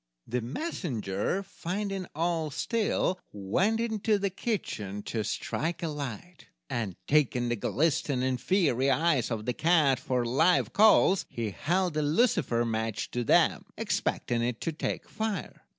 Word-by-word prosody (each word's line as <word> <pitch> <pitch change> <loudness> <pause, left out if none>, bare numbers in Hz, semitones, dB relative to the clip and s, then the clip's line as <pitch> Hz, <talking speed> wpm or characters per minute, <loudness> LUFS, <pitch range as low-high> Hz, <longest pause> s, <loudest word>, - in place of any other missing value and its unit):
The 125 +1 -2
messenger, 125 - -2
finding 195 0 -4
all 165 -1 0
still, 200 - 0
went 175 - 0
into 220 -2 +1
the 200 -1 -1
kitchen 105 - -3
to 110 -2 -2
strike 165 +10 -3
a 165 - 0
light, 150 +4 -7 0.2
and, 105 -7 -2
taking 130 -5 +2
the 120 - +1
glistening, 130 0 0
fiery 140 -6 +2
eyes 145 -2 +2
of 110 -3 -3
the 125 - 0
cat 155 -4 +3
for 125 -2 -1
live 160 +9 +3
coals, 205 -2 +5
he 115 -3 -3
held 175 - 0
a - - +2
lucifer 150 - +2
match 110 -2 -2
to 125 - -1
them, - - +3
expecting 120 -1 -1
it 120 -1 -1
to 165 - -1
take 155 - -4
fire. 215 -5 -4
150 Hz, 140 wpm, -29 LUFS, 120-185 Hz, 0.2 s, coals